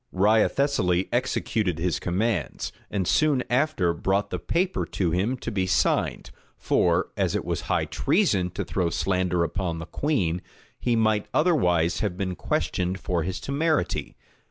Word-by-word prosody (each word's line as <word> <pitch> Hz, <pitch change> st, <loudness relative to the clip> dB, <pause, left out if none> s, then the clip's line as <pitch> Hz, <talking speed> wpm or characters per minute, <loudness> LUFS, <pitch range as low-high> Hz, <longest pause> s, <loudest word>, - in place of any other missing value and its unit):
Wriothesely 105 Hz, -1 st, +2 dB
executed 100 Hz, -7 st, 0 dB
his 85 Hz, -1 st, -1 dB
commands; 95 Hz, -1 st, -1 dB, 0.2 s
and 95 Hz, -4 st, -1 dB
soon 150 Hz, -4 st, +3 dB
after 125 Hz, -, +2 dB
brought 95 Hz, +4 st, 0 dB
the 90 Hz, -, -2 dB
paper 180 Hz, -, 0 dB
to 90 Hz, -4 st, -1 dB
him 100 Hz, +10 st, 0 dB
to 115 Hz, -, -5 dB
be 95 Hz, -3 st, 0 dB
signed; 90 Hz, -, +1 dB, 0.3 s
for, -, -, +1 dB
as -, -, 0 dB
it -, -, -2 dB
was -, -, -2 dB
high -, -, +2 dB
treason 135 Hz, -, +1 dB
to 90 Hz, -, -4 dB
throw 90 Hz, -3 st, 0 dB
slander 90 Hz, -1 st, 0 dB
upon 85 Hz, 0 st, -2 dB
the 85 Hz, -, -6 dB
queen, 90 Hz, -, -1 dB, 0.4 s
he 120 Hz, -1 st, +1 dB
might 110 Hz, -2 st, +2 dB
otherwise 90 Hz, -, +2 dB
have 100 Hz, -4 st, -2 dB
been 95 Hz, -2 st, -2 dB
questioned 90 Hz, +2 st, -1 dB
for 90 Hz, -2 st, -1 dB
his 90 Hz, +3 st, -3 dB
temerity. 155 Hz, +3 st, -1 dB
95 Hz, 150 wpm, -25 LUFS, 90-125 Hz, 0.4 s, soon